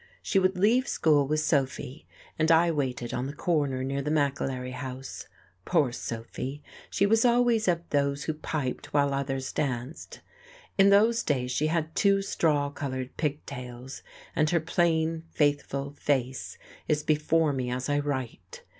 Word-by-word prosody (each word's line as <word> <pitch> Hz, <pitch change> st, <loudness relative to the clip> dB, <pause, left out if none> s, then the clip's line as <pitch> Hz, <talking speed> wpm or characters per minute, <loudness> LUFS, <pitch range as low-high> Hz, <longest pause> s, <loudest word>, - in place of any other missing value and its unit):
She 195 Hz, -, +2 dB
would 185 Hz, 0 st, +1 dB
leave 235 Hz, +8 st, +3 dB
school 145 Hz, -3 st, +3 dB
with 155 Hz, +1 st, +1 dB
Sophy, 140 Hz, -2 st, -1 dB, 0.3 s
and 160 Hz, +1 st, +3 dB
I 165 Hz, +1 st, +5 dB
waited 130 Hz, -5 st, -2 dB
on 125 Hz, +2 st, -2 dB
the 145 Hz, -, -7 dB
corner 145 Hz, -7 st, 0 dB
near 135 Hz, +1 st, -2 dB
the 145 Hz, -, -3 dB
McAlery 135 Hz, -4 st, -1 dB
house. 130 Hz, 0 st, -7 dB, 0.4 s
Poor 150 Hz, -, +2 dB
Sophy! 125 Hz, +4 st, -6 dB, 0.3 s
She 200 Hz, -, +2 dB
was 225 Hz, +2 st, +4 dB
always 240 Hz, -3 st, +3 dB
of 170 Hz, -1 st, +1 dB
those 140 Hz, 0 st, +1 dB
who 155 Hz, -, -2 dB
piped 150 Hz, -4 st, -4 dB
while 140 Hz, -1 st, +3 dB
others 135 Hz, 0 st, -2 dB
danced. 130 Hz, +1 st, -4 dB, 0.5 s
In 195 Hz, 0 st, +6 dB
those 220 Hz, +4 st, +5 dB
days 125 Hz, -4 st, -1 dB
she 150 Hz, +4 st, +1 dB
had 160 Hz, 0 st, -1 dB
two 200 Hz, -1 st, +3 dB
straw 145 Hz, -6 st, +1 dB
coloured 130 Hz, -3 st, -5 dB
pigtails, 130 Hz, -4 st, -5 dB, 0.3 s
and 150 Hz, 0 st, +2 dB
her 170 Hz, -, +3 dB
plain, 165 Hz, 0 st, +1 dB
faithful 140 Hz, -2 st, 0 dB
face 130 Hz, -3 st, -2 dB, 0.3 s
is 150 Hz, -1 st, +1 dB
before 155 Hz, 0 st, +2 dB
me 130 Hz, -2 st, -2 dB
as 125 Hz, +1 st, -3 dB
I 145 Hz, 0 st, +1 dB
write. 130 Hz, -10 st, -5 dB
145 Hz, 155 wpm, -28 LUFS, 130-165 Hz, 0.5 s, In